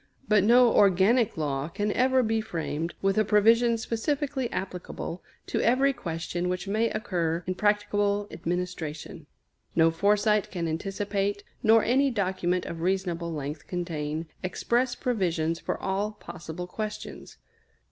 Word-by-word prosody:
But 210 -3 +4
no 240 +2 +6
organic 200 +4 +4
law 140 -2 -1
can 205 +5 -2
ever 260 +2 +3
be 220 0 +1
framed 165 -3 -4
with 195 +2 +2
a - - +4
provision 230 +3 +4
specifically 265 +3 -2
applicable 180 -2 -5 0.2
to - - -1
every 265 +4 +3
question 170 -1 -3
which 180 +2 -3
may 220 +3 +1
occur 170 -6 -1
in 185 - -1
practicable 205 0 +1
administration. 170 -3 -4 0.5
No 165 0 +5
foresight 205 +4 +2
can 170 -3 -3
anticipate, 200 +4 -2 0.2
nor 225 0 +5
any 270 +4 +3
document 185 -5 -1
of 165 -1 -6
reasonable 175 -2 -1
length 150 -1 -5
contain, 160 -3 -3 0.2
express 240 +7 0
provisions 170 -8 -1
for - - -3
all 200 +2 -1
possible 170 -3 -8
questions. 210 +3 -6
195 Hz, 130 wpm, -27 LUFS, 170-220 Hz, 0.5 s, no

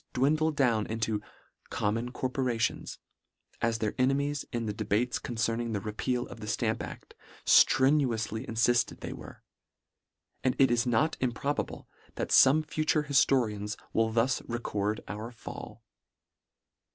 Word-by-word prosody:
dwindle 155 +5 +2
down 125 -8 +1
into 110 -1 -1 0.3
" - - -42
common 115 +4 -1
corporations," 125 -3 -2 0.6
as 115 -1 +1
their 110 -1 -1
e - - +4
nemies 140 +1 0
in 120 -2 -2
the 105 - -2
debates 110 +3 0
concerning 115 -1 -2
the 100 - 0
repeal 120 +4 -2
of 120 - -10
the 105 - -7
Stamp 115 0 -1
aft, - - -9 0.3
ffrenuously 125 -5 +4
iniifted 115 +2 +1
they - - -5
were: - - -11 1.0
and 130 -2 +2
it 135 -3 +5
is 120 +1 +2
not 120 +6 +2
improbable, 130 +3 -2 0.3
that - - -3
fome 150 +4 +6
future 155 0 +1
hiftorians 120 -7 +2 0.2
will 110 0 +2
thus 120 +3 +1
record 105 -3 -2
our 110 +3 -6
fall. 115 - -9
120 Hz, 135 wpm, -29 LUFS, 110-130 Hz, 1.0 s, fome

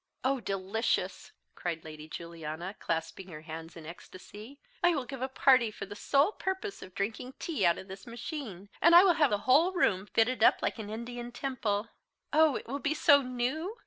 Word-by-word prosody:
"Oh 265 +1 +1
delicious!" 195 +1 -2 0.2
cried 165 -2 -4
Lady 155 -1 -10
Juliana, 170 +2 -6
clasping 165 +3 -3
her 155 -4 -9
hands 160 +1 -9
in 160 - -10
ecstasy. 205 - -11 0.2
"I 350 -1 +4
will 270 -4 -2
give 265 +1 -8
a 260 - 0
party 260 -3 +4
for 210 - -7
the 205 +1 -9
sole 280 - +2
purpose 380 0 -4
of 185 - -11
drinking 225 +6 -4
tea 245 - 0
out 170 - +3
of 190 - -9
this 190 +3 -10
machine; 235 - -7
and 340 +2 +7
I 350 - +10
will 375 -3 +5
have 305 -4 +3
the 205 - +1
whole 315 +9 +5
room 200 - +1
fitted 225 +2 +1
up - - +5
like - - -1
an 210 -2 -6
Indian 240 +2 -6
temple. 230 -5 -2 0.4
Oh! 310 -2 +5
it - - -5
will 275 +4 -3
be 290 +2 -1
so 285 -1 +6
new! 260 - -3
235 Hz, 195 wpm, -30 LUFS, 190-280 Hz, 0.4 s, I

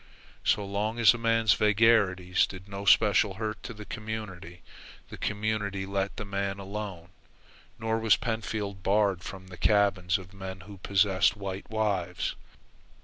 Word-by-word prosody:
So 105 - +2
long 105 +3 -2
as 115 -2 +7
a 120 - -6
man's 115 -3 +3
vagaries 100 -4 +3
did 95 0 -10
no 100 0 -6
special 105 -2 +4
hurt 110 +1 -4
to - - -7
the 105 -2 -9
community, 105 -6 -7 0.5
the - - -9
community 105 -2 -2
let 100 0 -2
the 110 - -4
man 100 0 -2
alone, 100 -3 -6 0.7
nor 110 0 -1
was 110 -1 +4
Pentfield 110 -4 -3
barred 100 -2 +2
from 95 0 -9
the 90 - -10
cabins 100 -1 +2
of 95 0 -12
men 95 -1 -7
who 100 +1 -12
possessed 100 +1 +2
white 95 -1 -6
wives. 100 -5 -1
100 Hz, 145 wpm, -28 LUFS, 95-110 Hz, 0.7 s, as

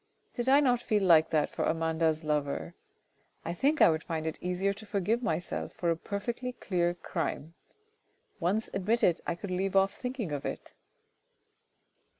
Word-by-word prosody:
Did 240 +1 -1
I 280 +2 +6
not 245 -4 +3
feel 210 -2 +1
like 165 -3 +6
that 150 -2 +1
for - - -2
Amanda's 160 -1 +1
lover! 140 - -1 0.7
I 170 - -2
think 285 - +1
I - - +8
would 160 0 -1
find 160 -2 -3
it 160 - -4
easier 180 +2 0
to 220 +2 -11
forgive 210 +4 0
myself 170 -6 -2
for 170 -1 0
a - - +1
perfectly 235 +8 -4
clear 175 -6 0
crime; 165 -2 -4 0.9
once 195 +5 0
admitted, 195 -3 +2
I - - 0
could 185 +2 -7
leave 190 +2 -1
off 195 0 +4
thinking 250 - -4
of 145 -1 -3
it. - - -6
180 Hz, 160 wpm, -30 LUFS, 160-220 Hz, 0.9 s, I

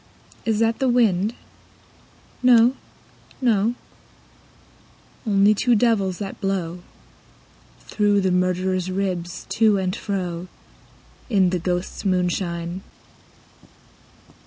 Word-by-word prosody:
Is 220 -2 +1
that 225 +1 +1
the 265 - +2
wind? 220 -3 +2 1.1
No, 245 -1 +6 0.7
no; 230 -2 +2 1.5
Only 200 0 +4
two 240 +3 +2
devils, 205 -5 +1
that 200 0 -7
blow 180 -3 -2 1.0
Through 205 -1 +1
the 190 -1 +1
murderer's 185 0 0
ribs 185 -2 -3
to 215 -2 +3
and 185 0 -1
fro. 180 -4 -4 0.8
In 190 -5 +3
the 180 - 0
ghosts' 180 +1 -3
moonshine. 180 -2 -1
195 Hz, 90 wpm, -22 LUFS, 180-220 Hz, 1.5 s, No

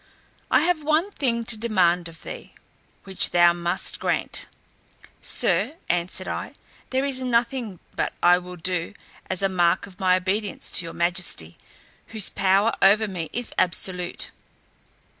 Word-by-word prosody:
I - - +4
have 345 -2 +1
one 310 +6 +1
thing 235 -9 -1
to 225 - +1
demand 180 -6 +2
of 165 -1 -14
thee, - - -9 0.5
which 190 -1 0
thou 175 0 +5
must 175 +1 -1
grant." - - -1 0.7
"Sir," 310 - +2
answered 175 0 -1
I, - - -4 0.4
"there 265 +1 0
is 265 -2 -2
nothing 235 -5 -1 0.2
but - - -1
I 175 +1 +6
will 180 0 -9
do, 180 +2 -2 0.3
as 190 +1 +2
a - - +4
mark 180 -1 +2
of 190 -2 -16
my 185 -1 +4
obedience 195 +3 -2
to 175 - -1
your 165 - -7
majesty, 170 - -1 0.5
whose 215 -4 +1
power 195 +3 +2
over 215 +3 +5
me 175 -5 -5
is 240 -1 -3
absolute." 180 0 0
190 Hz, 145 wpm, -24 LUFS, 175-230 Hz, 0.7 s, I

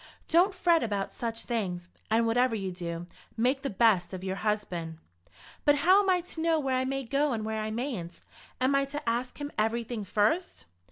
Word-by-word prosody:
Don't 365 +4 +4
fret 340 -3 +3
about 205 -3 -2
such 230 -1 -3
things, 185 -7 -3 0.2
and 225 +1 +3
whatever 240 +1 +2
you 195 -3 -3
do, 170 -1 -5 0.3
make 255 +4 +2
the 275 - -2
best 190 -4 +3
of 185 - -8
your 190 0 -3
husband." 185 -7 -2 0.7
"But 290 - +5
how 365 +7 +5
am 390 - 0
I 365 -1 +3
to 335 -2 -7
know 325 -1 +2
where 270 -3 0
I 255 0 +1
may 270 +1 -2
go 275 +3 +1
and 215 -2 -3
where 220 0 -2
I 215 - -2
mayn't? 215 -8 -4 0.4
Am 260 +2 +2
I 275 0 +3
to 290 0 -6
ask 240 +2 -1
him 290 0 -4
everything 225 0 -1
first?" 215 - 0
235 Hz, 200 wpm, -29 LUFS, 205-280 Hz, 0.7 s, But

